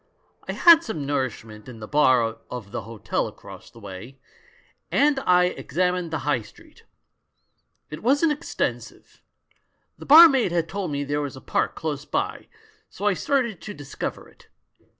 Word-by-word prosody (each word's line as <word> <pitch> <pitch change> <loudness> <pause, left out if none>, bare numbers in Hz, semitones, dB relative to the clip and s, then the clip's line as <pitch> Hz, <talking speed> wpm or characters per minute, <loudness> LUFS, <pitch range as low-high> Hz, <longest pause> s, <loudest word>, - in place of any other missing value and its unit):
I - - -3
had 335 -1 +7
some 160 - -5
nourishment 115 -5 -4
in 115 -3 -11
the 105 - -8
bar 125 -6 +2
of 120 -5 -8
the - - -4
hotel 110 +1 -3
across - - -12
the - - -20
way, 100 +6 -10 0.7
and 285 -1 +3
I 180 0 +5
examined 180 0 -1
the 155 -3 -4
High 145 -5 +1
Street. - - -18 1.1
It 155 - -7
wasn't 285 +7 +2
extensive. 295 +3 -5 0.8
The - - -11
bar 325 +4 +11
maid 265 - +1
had 170 -1 0
told 195 0 -4
me 145 -1 -2
there 145 +1 -2
was 140 -2 -5
a - - -10
park - - -2
close 150 -3 -4
by, - - -3 0.4
so 205 - -7
I 205 - +3
started 235 - -1
to 210 - -8
discover 145 -1 -6
it. - - -22
150 Hz, 160 wpm, -24 LUFS, 130-210 Hz, 1.1 s, bar